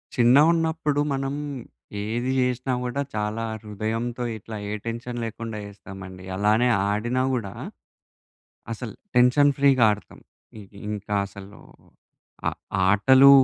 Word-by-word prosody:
చిన్నగున్నప్పుడు 150 +4 +4
మనం 135 0 -2 0.7
ఏది 120 +4 -1
జేసినా 125 +1 0
గూడా, 125 +3 -2
చాలా 105 +2 -1 0.2
హృదయంతో 115 +4 -3
ఇట్లా 110 +1 -9
ఏ - - -3
టెన్షన్ 115 +1 -4
లేకుండా 115 0 -5
జేస్తామండి. 95 -2 -10
అలానే 105 +5 +3 0.2
ఆడినా 120 +5 0
గూడా, 110 -6 -2 1.2
అసల్ 115 0 -6 0.2
టెన్షన్ 125 +4 +6
ఫ్రీగా 135 -4 +5
ఆడతాం. 105 0 -7 0.4
ఇ - - -8 0.3
ఇంకా 105 0 -4
అసలు 100 +1 -12 0.9
ఆ - - +5 0.4
ఆటలు 130 +7 +7
115 Hz, 105 wpm, -25 LUFS, 105-130 Hz, 1.2 s, ఆటలు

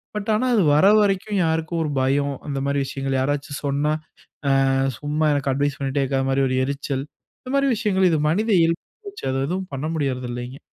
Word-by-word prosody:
But 210 0 -4
ஆனா, 255 +4 +1
அது 205 - +4
வர 170 +6 +5
வரைக்கும் 200 0 0
யாருக்கும் 160 +1 -1
ஒரு 150 - -2
பயம், 140 +1 +1
அந்த 140 -1 -2
மாரி 140 0 0
விஷயங்கள் 135 0 -2
யாராச்சும் 145 +1 -2
சொன்னா, 145 +2 +1 0.8
"அ - - +2 0.3
சும்மா 150 +1 0
எனக்கு 140 -1 0
அட்வைஸ் 140 +1 -1
பண்ணிட்டே 140 0 0
இருக்காத" 135 0 0
மாரி 135 +1 +2
ஒரு 130 - 0
எரிச்சல். 140 -1 -3 0.4
இந்த 255 - -7
மாரி 275 0 +3
விஷயங்கள் 190 -4 +2
இது 160 - +2
மனித 215 +8 +1
இயல்பாகிப்போச்சு. 395 - -3
அது 135 - -1
எதுவும் 185 +2 -3
பண்ண 140 +3 -3
முடியறதில்லைங்க. 125 -2 -3
145 Hz, 180 wpm, -22 LUFS, 135-185 Hz, 0.8 s, வர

